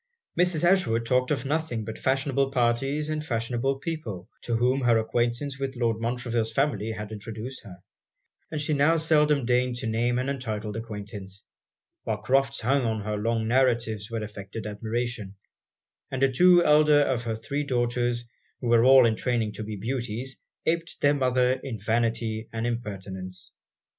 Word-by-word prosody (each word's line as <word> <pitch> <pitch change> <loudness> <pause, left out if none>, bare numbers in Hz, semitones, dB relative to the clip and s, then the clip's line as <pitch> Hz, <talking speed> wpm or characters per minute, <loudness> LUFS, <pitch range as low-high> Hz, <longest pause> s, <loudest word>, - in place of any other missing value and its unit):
Mrs. 175 -2 +1
Ashwood 175 -11 +3
talked 125 +1 +2
of 135 -3 -1
nothing 140 -7 -1
but 110 - -6
fashionable 135 0 +1
parties 135 +4 +1
and 155 0 -2
fashionable 120 +1 -1
people, 135 - -5
to 120 - -2
whom 125 +4 +2
her 120 -2 +4
acquaintance 120 +5 -1
with 135 -1 -3
Lord 115 -2 0
Montreville's 120 -1 -1
family 115 -4 0
had 105 -1 -6
introduced 110 +4 -7
her; 95 -5 -12 0.7
and 155 - -3
she 155 +1 0
now 150 +3 +4
seldom 150 -4 +3
deigned 125 0 +2
to 120 0 -4
name 120 +2 +1
an 130 +1 -1
untitled 110 -6 -3
acquaintance 105 -3 -7 0.6
while - - -1
Crofts 135 +1 +1
hung 135 +4 +2
on 110 -2 -1
her 105 +1 -2
long 110 +1 0
narratives 115 -4 +1
with 115 -1 -3
affected 105 0 -7
admiration; 110 0 -3 0.7
and 135 0 -2
the 135 - +5
two 175 +5 +6
elder 150 0 +6
of 130 -4 +1
her 115 -1 -1
three 140 +6 -3
daughters, 120 -2 0 0.3
who 120 - -3
were 115 -1 +5
all 130 0 +8
in 115 -1 +2
training 115 -3 0
to 110 - -6
be 105 0 -5
beauties, 120 +3 -4 0.3
aped 165 0 -1
their 145 0 +5
mother 130 -2 +2
in 130 -5 -4
vanity 115 +1 -1
and 115 0 -3
impertinence. 95 -5 -5
120 Hz, 165 wpm, -26 LUFS, 110-135 Hz, 0.7 s, all